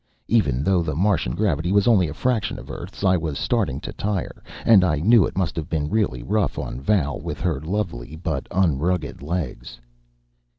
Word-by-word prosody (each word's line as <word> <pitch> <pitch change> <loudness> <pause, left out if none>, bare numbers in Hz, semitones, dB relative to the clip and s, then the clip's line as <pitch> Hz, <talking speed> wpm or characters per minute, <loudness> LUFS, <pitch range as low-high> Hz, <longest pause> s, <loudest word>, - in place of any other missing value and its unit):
Even 75 - +2
though 95 +1 +3
the 75 -4 -2
Martian 90 -8 +1
gravity 85 -5 0
was 100 +1 +3
only 100 -8 +5
a 70 - -5
fraction 115 -1 0
of - - -9
Earth's, - - -8
I 95 -1 +4
was 80 -4 -3
starting 95 - 0
to - - -6
tire, 100 -3 -3 0.2
and 105 -5 +7
I 85 -4 +2
knew 105 +8 +5
it - - -9
must 90 -4 0
have 80 0 -4
been 75 -2 -1
really 100 - 0
rough 105 - 0
on 60 - -5
Val 75 -4 +1
with - - -5
her 80 -7 -1
lovely 80 -6 -3
but 80 -4 -3
unrugged 85 -3 0
legs. 70 -7 -4
85 Hz, 185 wpm, -23 LUFS, 75-100 Hz, 0.2 s, and